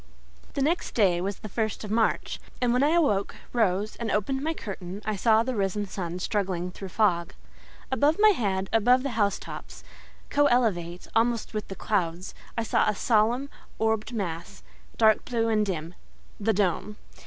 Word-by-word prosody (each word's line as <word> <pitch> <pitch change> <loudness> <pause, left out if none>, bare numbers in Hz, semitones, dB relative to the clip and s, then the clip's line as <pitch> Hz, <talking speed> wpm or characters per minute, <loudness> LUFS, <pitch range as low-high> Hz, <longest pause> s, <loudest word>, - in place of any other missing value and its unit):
The 275 - +1
next 335 +5 0
day 185 -6 +3
was 195 +1 -2
the - - -8
first 220 +1 -2
of 210 - -6
March, 225 0 +1 0.2
and 245 -1 +2
when 250 - +3
I 295 +3 +3
awoke, 210 -13 +2 0.2
rose, 210 -2 +1
and 230 -1 -3
opened 240 +7 0
my 320 +2 -1
curtain, 195 - -7
I 215 0 -1
saw 220 +2 +4
the 255 +2 -2
risen 205 0 0
sun 180 -3 -5
struggling 185 -2 -1
through 195 +1 -8
fog. 175 -4 +1 0.6
Above 285 +5 +3
my 430 +1 +7
head, 195 - 0
above 245 +4 +4
the 275 - -2
house 205 -4 +1
tops, - - -9 0.5
co 290 0 +4
elevate 180 -9 0
almost 230 0 +1
with 215 -1 -3
the 195 - -7
clouds, 180 -4 -1 0.2
I 230 - +1
saw 220 - +2
a 210 - 0
solemn, 235 +6 +2 0.3
orbed 220 0 0
mass, 190 -3 -5 0.3
dark 220 -1 +4
blue 230 -2 0
and 215 -1 +3
dim—THE 185 +4 -4
DOME. 205 +1 0
215 Hz, 170 wpm, -27 LUFS, 190-235 Hz, 0.6 s, my